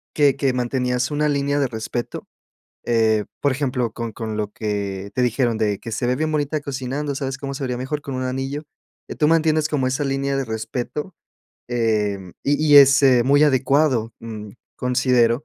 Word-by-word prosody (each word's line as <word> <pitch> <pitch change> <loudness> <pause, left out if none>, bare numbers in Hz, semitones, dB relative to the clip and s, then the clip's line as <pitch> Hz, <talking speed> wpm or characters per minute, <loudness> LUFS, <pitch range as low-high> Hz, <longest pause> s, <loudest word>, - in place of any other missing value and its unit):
que 145 -3 +4
que 135 -2 +1
mantenías 125 +1 -1
una 150 +1 +1
línea 140 0 0
de 140 - +2
respeto. 120 +1 -5 0.6
Eh, 110 -2 +2 0.2
por 145 - +2
ejemplo, 125 -4 -1
con 115 -1 -5
con 110 0 -5
lo 105 -1 -3
que 100 -2 -3
te 125 - +1
dijeron 120 -1 +1
de 105 -2 0
que 115 - -7
se 120 +2 -1
ve 125 +1 +1
bien 155 +2 -1
bonita 150 0 -1
cocinando, 140 +1 -3
¿sabes 135 -1 -3
cómo 140 0 -5
se 135 - -4
vería 125 -1 -2
mejor 145 +4 -3
con 140 - -6
un 130 0 -2
anillo? 135 +3 -3 0.5
Eh, - - -6
tú 150 - +2
mantienes 155 -1 +3
como 135 -4 0
esa 130 +3 -1
línea 135 0 -1
de 135 - -1
respeto, 120 - -4 0.5
em, 105 -6 -1
y 145 - +3 0.2
y, - - +11
es, 135 0 +7
eh, 130 -3 +5
muy 140 +3 +4
adecuado, 130 -4 +2
mm, 110 -2 -7 0.3
considero. 125 0 +2
130 Hz, 185 wpm, -22 LUFS, 115-140 Hz, 0.6 s, y